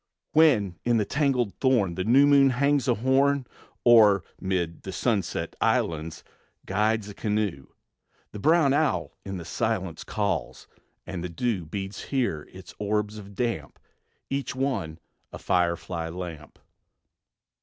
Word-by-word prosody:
When 115 - +3
in 120 -1 +2
the 105 - +1
tangled 130 -6 0
thorn 120 -9 +2
The 95 +2 -2
new 130 +7 +5
moon 140 -1 +6
hangs 140 +2 +1
a 120 - +3
horn, 135 +3 +2 0.4
Or, 105 -5 +6 0.2
'mid 90 -4 -2
the 95 - -6
sunset's 95 -1 -1
islands, 80 0 0 0.4
Guides 105 +2 0
a - - -8
canoe, 105 - -2 0.6
The 105 - -8
brown 155 +2 +4
owl 110 - +1
in 95 -1 -5
the 85 - -7
silence 95 -3 -2
Calls, 105 -1 -3 0.4
and 90 -2 -5
the 90 - -4
dew 90 -1 -2
Beads 95 +3 -5
here 120 - -2
its 95 -1 -12
orbs 105 0 -1
of 100 -1 -12
damp, 115 -11 -3 0.5
Each 135 -1 -3
one 115 - -2 0.3
a - - -7
firefly 85 -1 -1
lamp. 85 -3 -8
105 Hz, 135 wpm, -26 LUFS, 90-125 Hz, 0.6 s, moon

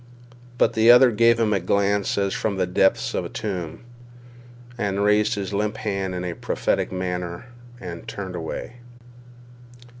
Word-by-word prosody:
But - - +3
the 110 +1 +4
other 125 +1 +8
gave 115 +1 +4
him 110 -2 +2
a 100 - +2
glance 100 +2 0
as 100 -1 0
from 100 -3 -2
the 95 - +1
depths 90 +2 +1
of - - -1
a - - -6
tomb, 90 -7 -5 0.9
and 100 -4 -1
raised 105 +2 +3
his 100 -1 -4
limp 105 +2 -1
hand 95 -3 -3
in 90 0 -4
a 90 - -3
prophetic - - -1
manner 90 0 -4 0.3
and 85 -2 -8
turned 95 -2 -6
away. 85 +8 -6
100 Hz, 155 wpm, -23 LUFS, 90-105 Hz, 0.9 s, other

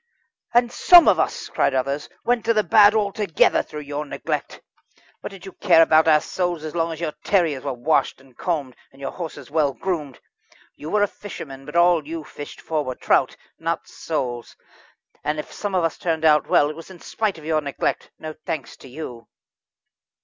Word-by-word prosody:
"And 240 0 +4
some 350 +4 +7
of - - +5
us," - - -1
cried 135 - +1
out 130 - +4
others, 140 +2 -4
"went 240 -2 +1
to 230 0 +2
the 215 - +3
bad 205 +4 +6
altogether, 205 -4 +2
through 150 -1 -8
your 145 +1 -4
neglect. 145 - -4 0.6
What - - -6
did 195 -3 -12
you 190 - -8
care 175 -4 +5
about 160 0 +4
our 155 -1 +5
souls 175 -3 -2
so 155 - -4
long 165 0 0
as 160 - -6
your 160 -3 -3
terriers 165 -9 +1
were 140 - -2
washed 130 +5 0
and 130 -2 -21
combed, 145 -7 -3 0.2
and 135 - -20
your 135 - -4
horses 150 -6 -8
well 150 -3 +2
groomed? 155 -8 -4 0.6
You 150 - -8
were 210 +2 +2
a - - +3
fisherman, 135 -10 -9
but 150 - -9
all 170 -3 +4
you 165 0 -5
fished 145 -1 -10
for 155 -2 -1
were 130 -2 -4
trout - - +1 0.2
not - - -2
souls. 120 -2 -4 0.7
And 150 +1 -1
if 150 - -6
some 205 -2 -3
of 180 - +2
us 165 - -1
turned 160 -2 -1
out 150 -1 +4
well, 145 +1 +3
it - - -10
was 165 +3 -11
in 185 -2 -12
spite 210 -1 -2
of 155 - -12
your 155 -1 +1
neglect 140 -2 -2
no 155 0 -7
thanks 155 -2 -6
to - - -14
you." 125 -4 -8
160 Hz, 200 wpm, -22 LUFS, 145-180 Hz, 0.7 s, some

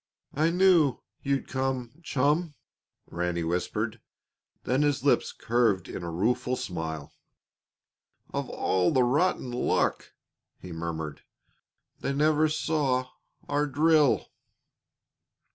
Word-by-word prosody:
"I 155 +3 +2
knew 175 -6 +4 0.2
you'd 140 -1 -1
come 130 +1 -3
chum," 150 +2 0 0.5
Ranny 85 0 -2
whispered. 85 +2 -2 0.6
Then 130 +3 +1
his 145 -3 +1
lips 140 - +2
curved 115 -6 +1
in - - -6
a 85 - -4
rueful 115 +8 0
smile. 80 - -5 1.2
"Of - - -2
all 90 -1 +1
the 130 - +3
rotten 135 0 +1
luck!" 120 - 0 0.5
he 90 - -10
murmured. 80 -2 -5 0.8
"They 140 - -2
never 155 +2 +3
saw 140 -5 0 0.4
our 145 +1 +1
drill." 150 0 +3
130 Hz, 105 wpm, -28 LUFS, 95-150 Hz, 1.2 s, knew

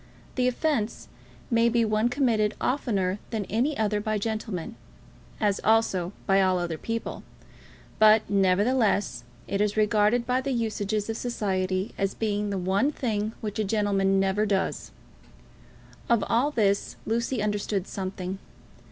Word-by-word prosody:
The 250 -1 +1
offence 250 -4 -1 0.4
may 230 0 +4
be 235 -1 +2
one 215 +2 +1
committed 235 -6 +1
oftener 205 -8 0
than 215 -4 -2
any 260 +8 +1
other 210 -1 0
by 215 0 -1
gentlemen, 215 -4 -3 0.7
as 205 -2 +1
also 205 -5 +2
by 195 -1 +4
all 185 -1 +3
other 170 -3 -3
people; 230 0 -4 0.8
but, 215 0 +6
nevertheless, 200 - +2 0.2
it 200 +1 -1
is 210 0 0
regarded 215 +2 +3
by 250 +1 +1
the 275 0 -2
usages 215 -3 -1
of 225 0 -3
society 190 -5 -1
as 195 0 0
being 210 -2 -1
the 200 - -2
one 195 +9 +1
thing 220 -6 -2
which 215 0 -4
a - - +2
gentleman 195 -2 +1
never 195 +2 +1
does. 195 -1 -1 1.2
Of 235 -3 +3
all 245 +6 +2
this 205 -8 0
Lucy 235 +2 -1
understood 205 -2 -1
something. 190 -1 -5
210 Hz, 140 wpm, -26 LUFS, 195-230 Hz, 1.2 s, but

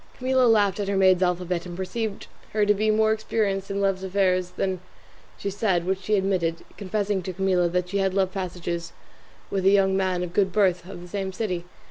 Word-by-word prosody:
Camilla 255 0 +3
laughed 205 -3 +3
at 200 - -2
her 200 0 0
maid's 185 -1 +5
alphabet, 180 -1 0
and 175 0 -7
perceived 205 +2 -3 0.3
her 210 -1 +3
to 205 - +4
be 215 +2 0
more 220 0 +3
experienced 210 -3 -1
in 200 0 -2
love 195 -1 0
affairs 185 -1 +1
than 190 -2 -1 0.6
she 200 - -3
said, 190 -4 0
which 190 +1 -1
she 210 +3 +1
admitted, 185 -4 0
confessing 200 0 -1
to 185 - -5
Camilla 185 -1 +2
that 180 +1 -1
she 200 +1 -1
had 190 -1 +1
love 190 -1 +2
passages 175 -2 -4 0.6
with 195 -1 -1
a 190 - +6
young 195 -1 +4
man 185 -2 0
of 175 -1 -6
good 195 0 +2
birth 185 -3 +1
of 175 - -8
the - - -10
same 195 +1 -3
city. 185 -3 -3
190 Hz, 205 wpm, -25 LUFS, 180-200 Hz, 0.6 s, a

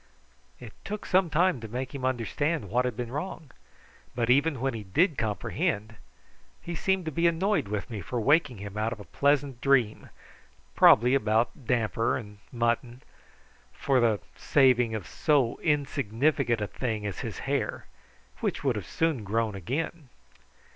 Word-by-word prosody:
It 110 - -10
took 210 +1 -5
some 185 -2 +3
time 165 -4 +2
to 110 - -6
make 125 +5 -5
him 135 -2 -4
understand 130 - -1
what 125 +2 +2
had 125 -3 -3
been 120 -1 -4
wrong, 150 -1 -5 0.6
but 120 0 +1
even 140 +1 +3
when 135 +1 -1
he 110 -2 -5
did 155 - +2
comprehend 110 -1 -2 0.6
he 170 - -6
seemed 190 +1 0
to 160 - -2
be 170 +3 +2
annoyed 185 - +1
with 105 0 -3
me 105 -3 -4
for 120 +8 -3
waking 140 0 +3
him 100 +1 -8
out 110 +1 0
of 115 - -6
a - - -8
pleasant 140 - 0
dream, 125 -6 +2 0.7
probably 125 +3 +6
about 115 0 +1
damper 115 -2 +1
and 105 -4 -10
mutton, 120 +1 -1 0.7
for 135 -2 +1
the 115 -4 +2 0.2
saving 125 -5 +3
of 105 -6 -5
so 135 - +1
insignificant 140 -4 0
a - - 0
thing 110 -4 -3
as 100 -3 -4
his - - -5
hair, - - -2 0.5
which - - -2
would - - +1
have - - -5
soon 160 -8 0
grown 110 +2 -1
again. 140 - -4
125 Hz, 160 wpm, -28 LUFS, 110-145 Hz, 0.7 s, probably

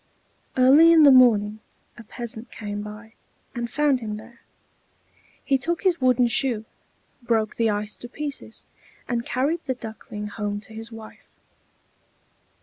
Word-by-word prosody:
Early 280 +6 +7
in 325 -2 +7
the 285 - +8
morning 220 -5 +5 0.4
a 235 - -12
peasant 230 +1 -5
came 205 -1 -6
by, 210 +2 -10 0.4
and 240 -2 -4
found 285 -1 +2
him 215 -3 -5
there; 235 +2 -14 1.0
he 270 -2 +1
took 340 +6 -2
his 360 -6 +1
wooden 250 -1 +4
shoe, 235 -2 0 0.6
broke 225 -3 0
the 230 -1 +2
ice 210 0 -2
to 240 - -9
pieces, 290 +2 -6 0.4
and 235 -1 -1
carried 280 +8 -1
the 260 - -1
Duckling 220 -3 -8
home 205 -1 -4
to 220 - -14
his 225 +1 -8
wife. 225 -1 -13
235 Hz, 145 wpm, -24 LUFS, 215-260 Hz, 1.0 s, the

